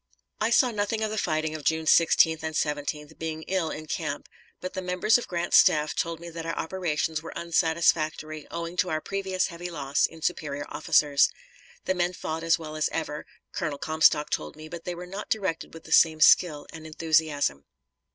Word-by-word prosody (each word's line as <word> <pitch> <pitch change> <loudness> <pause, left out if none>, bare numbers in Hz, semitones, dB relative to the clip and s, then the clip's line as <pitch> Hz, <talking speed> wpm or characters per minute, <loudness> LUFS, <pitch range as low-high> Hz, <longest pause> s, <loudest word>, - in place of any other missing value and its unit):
I 215 - +1
saw 245 +1 +4
nothing 215 +1 -1
of 215 - -1
the 215 - -3
fighting 155 -3 -1
of 155 -2 -6
June 160 +1 +1
16th 160 0 +4
and 160 0 -4
17th, 150 +1 -3
being 160 -1 -4
ill 185 -3 -1
in 155 0 -6
camp, - - -4 0.3
but 185 0 -6
the 190 - -3
members 180 +5 +2
of - - -7
Grant's 175 -1 +2
staff 150 0 +4
told 165 -1 -2
me 170 0 -9
that 165 0 -6
our 165 0 -4
operations 160 -3 -2
were 165 - -8
unsatisfactory, 160 -2 0
owing 170 +1 -5
to 185 - +1
our 155 - 0
previous 190 +1 -2
heavy 175 0 -7
loss 145 -4 0
in 160 -1 -14
superior 145 -5 -2
officers. 145 -2 +3 0.6
The 185 - +1
men 180 0 0
fought 160 -2 -4
as 165 0 +3
well 155 -2 -8
as 155 - 0
ever, 155 -2 -4 0.2
Colonel 145 -2 -3
Comstock 155 -1 +2
told 75 - -3
me, 155 0 -10
but 170 +1 -9
they 180 - -3
were 175 +1 -7
not 195 +3 -7
directed 190 -7 -2
with 165 - -11
the - - -13
same 160 -1 +5
skill 155 -2 +5
and 160 -1 -9
enthusiasm. 155 - 0
160 Hz, 195 wpm, -26 LUFS, 155-175 Hz, 0.6 s, same